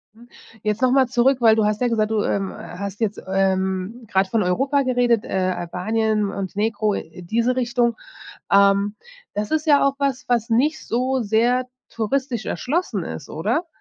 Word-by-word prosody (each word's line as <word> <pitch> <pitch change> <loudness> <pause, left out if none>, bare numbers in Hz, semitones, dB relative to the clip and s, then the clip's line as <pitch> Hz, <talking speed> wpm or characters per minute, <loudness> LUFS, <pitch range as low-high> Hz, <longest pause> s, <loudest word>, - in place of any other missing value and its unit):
Mhm. 240 +2 -18 0.3
Jetzt 215 +2 -1
noch 255 - +4
mal 265 -1 +4
zurück, 255 +1 +2
weil 225 -2 +6
du 220 -1 +2
hast 210 +2 0
ja 245 - +3
gesagt, 220 -2 0
du, 215 -1 +1
ähm, 195 -1 -1
hast 200 +3 -7
jetzt, 210 -2 -1
ähm, 190 +3 -1
grad 190 -1 +1
von 215 +1 +1
Europa 270 +10 +1
geredet, 245 -3 +2
äh, - - -10
Albanien, 190 +4 -1
Montenegro, 205 +2 -1
äh, 165 +3 -8
diese 235 +7 0
Richtung. 240 -2 +1 0.6
Ähm, 200 +1 +4 0.4
das 210 0 -3
ist 315 +1 0
ja 285 -2 +5
auch 275 - +1
was, 275 -2 -1
was 235 -2 +1
nicht 275 +7 +1
so 255 +2 0
sehr 235 +4 +2 0.2
touristisch 240 0 -2
erschlossen 335 +8 -2
ist, - - -7
oder? 340 - -1
225 Hz, 170 wpm, -22 LUFS, 200-255 Hz, 0.6 s, weil